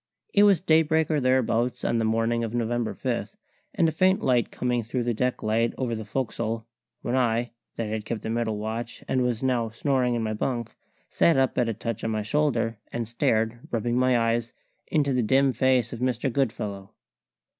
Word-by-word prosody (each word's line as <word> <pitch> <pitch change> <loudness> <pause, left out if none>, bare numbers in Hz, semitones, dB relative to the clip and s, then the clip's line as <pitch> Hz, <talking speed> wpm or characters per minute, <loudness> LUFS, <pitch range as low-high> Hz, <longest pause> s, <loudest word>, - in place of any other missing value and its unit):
It 200 - +5
was 205 -3 +6
daybreak 160 -2 +3
or 150 - +2
thereabouts 125 -2 +1
on 115 - +1
the 115 - +1
morning 115 +1 +1
of 115 +1 -3
November 120 -1 -1
5 - - -3 0.4
and 165 - +3
a - - +1
faint 185 +3 +2
light 125 -2 +2
coming 125 -1 -1
through 120 +3 -3
the 120 0 0
decklight 115 -1 0
over 125 -3 -1
the 110 -1 -4
fo'c's'le 115 -1 -3 0.4
when 120 - -1
I, 120 -1 +1 0.2
that 115 - -2
had 110 0 -3
kept 110 +1 -4
the 110 - -3
middle 115 -2 -1
watch 115 +2 -5
and 130 - +1
was 125 -1 -1
now 120 -3 +1
snoring 125 +1 0
in 115 - -1
my 110 -1 -1
bunk, 115 +1 -3 0.3
sat 165 - +3
up 135 -1 +2
at 120 -2 +2
a 115 - -2
touch 115 0 -4
on 115 - -1
my 110 -1 -1
shoulder, 120 -3 0
and 115 -2 -3
stared, 115 0 0
rubbing 120 +1 -1
my 130 0 +3
eyes, 115 0 0 0.3
into 145 -3 +1
the 125 - +2
dim 135 +4 +3
face 125 -1 +2
of 120 - -6
Mr. 125 0 -1
Goodfellow. 105 -7 -2
120 Hz, 195 wpm, -26 LUFS, 115-130 Hz, 0.4 s, was